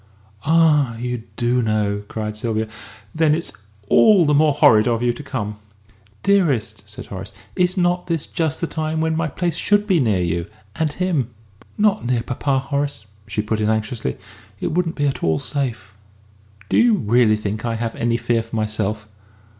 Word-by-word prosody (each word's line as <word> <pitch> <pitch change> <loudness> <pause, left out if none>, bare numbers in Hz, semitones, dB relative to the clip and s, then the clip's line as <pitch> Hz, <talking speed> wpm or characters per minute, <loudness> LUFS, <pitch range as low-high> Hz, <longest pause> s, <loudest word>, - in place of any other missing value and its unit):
"Ah, 150 -7 +4
you 120 -1 -4
do 120 +1 +2
know!" 105 -2 0
cried 105 -1 -4
Sylvia. 110 0 -2 0.5
"Then 155 -1 +3
it's 170 - -4 0.3
all 205 - +6
the 150 - +3
more 150 0 +4
horrid 110 -5 +5
of 120 0 +1
you 120 -1 +2
to 150 - -9
come!" 110 -7 -4 0.7
"Dearest," 130 - +1
said 105 - -9
Horace, 95 +1 -8 0.2
"is 180 0 +1
not 175 0 +1
this 165 -4 -1
just 160 -3 -2
the - - +1
time 155 -1 -2
when 160 0 +1
my 165 0 0
place 170 +2 -2
should 205 0 +2
be 190 -5 +3
near 110 -8 +2
you 85 +1 -1 0.3
and 160 -2 0
him?" 160 -8 -1 0.5
"Not 210 0 +2
near 120 -1 0
papa, 135 +2 -1
Horace!" 140 -3 -2 0.2
she 105 +1 -2
put 110 0 -1
in 105 - +1
anxiously; 110 - -2 0.4
"it - - -2
wouldn't 165 0 0
be 145 - 0
at 140 - -1
all 80 -1 +2
safe." 120 - -3 0.7
"Do - - +1
you 235 -2 +5
really 115 - +3
think 105 0 -4
I 115 -1 -1
have 115 0 -3
any 115 0 0
fear 115 0 +1
for 115 0 -8
myself?" 110 0 -2
125 Hz, 180 wpm, -21 LUFS, 110-160 Hz, 0.7 s, all